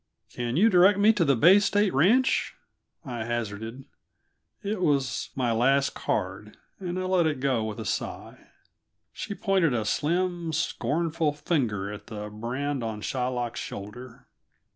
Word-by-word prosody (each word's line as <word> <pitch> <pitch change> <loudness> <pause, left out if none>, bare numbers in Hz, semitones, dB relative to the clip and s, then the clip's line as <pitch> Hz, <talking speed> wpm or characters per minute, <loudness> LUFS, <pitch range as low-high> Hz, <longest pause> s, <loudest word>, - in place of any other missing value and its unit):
"Can 120 +2 -2
you 210 +6 +6
direct 190 -1 +5
me 210 +2 +5
to 205 -5 +2
the 140 -4 +3
Bay 175 - +7
State 205 0 +2
Ranch?" 220 - +3 0.5
I 120 -4 -4
hazarded. 115 +2 -4 0.8
It 205 -1 -2
was 135 -8 0
my 125 -3 0
last 135 +5 +2
card, 105 +1 -3 0.2
and 180 -2 -4
I 185 - -2
let 185 -3 +2
it 150 -4 -1
go 130 -4 +1
with 110 -1 -5
a - - -5
sigh. - - -5 0.7
She 205 - -5
pointed 190 - +2
a 110 -2 -1
slim, 170 +5 -1
scornful 160 0 0
finger 115 - -1
at 105 - -10
the 105 -2 -7
brand 125 +5 -3
on 110 -2 -4
Shylock's 125 -1 -2
shoulder. 115 +5 -8
135 Hz, 145 wpm, -27 LUFS, 115-175 Hz, 0.8 s, Bay